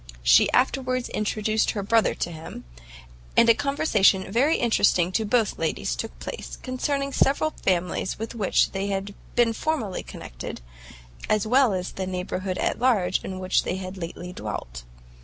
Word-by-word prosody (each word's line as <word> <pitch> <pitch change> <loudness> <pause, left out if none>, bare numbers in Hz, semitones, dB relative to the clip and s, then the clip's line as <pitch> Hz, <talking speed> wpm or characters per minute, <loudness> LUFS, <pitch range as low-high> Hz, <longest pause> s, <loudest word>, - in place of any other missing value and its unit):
She - - +6
afterwards 255 -1 +1
introduced 215 +1 0
her 200 - -1
brother 225 +2 +2
to 175 - -3
him; 160 0 -9 0.7
and 235 - +6
a 230 - +8
conversation 220 -9 +2
very 275 +9 +3
interesting 200 -6 +3
to 220 +3 0
both 220 0 +2
the - - -13
ladies - - -1
took - - -6
place, 475 - -7
concerning 275 +2 -2
several 285 +4 +2
families 180 - -1
with 225 +1 -5
which 210 -5 +2
they 195 +1 -2
had 200 0 -3 0.2
been 235 -1 +3
formerly 230 -8 -2
connected, - - -8 0.7
as 215 -1 +2
well 250 +1 +4
as 185 -1 -3
the 190 -1 -4
neighbourhood 185 0 -3
at - - -1
large 225 -8 +2
in 190 - -5
which 185 0 +1
they - - -3
had 190 0 -6
lately 180 0 -7
dwelt. 60 - -6
205 Hz, 160 wpm, -25 LUFS, 185-245 Hz, 0.7 s, a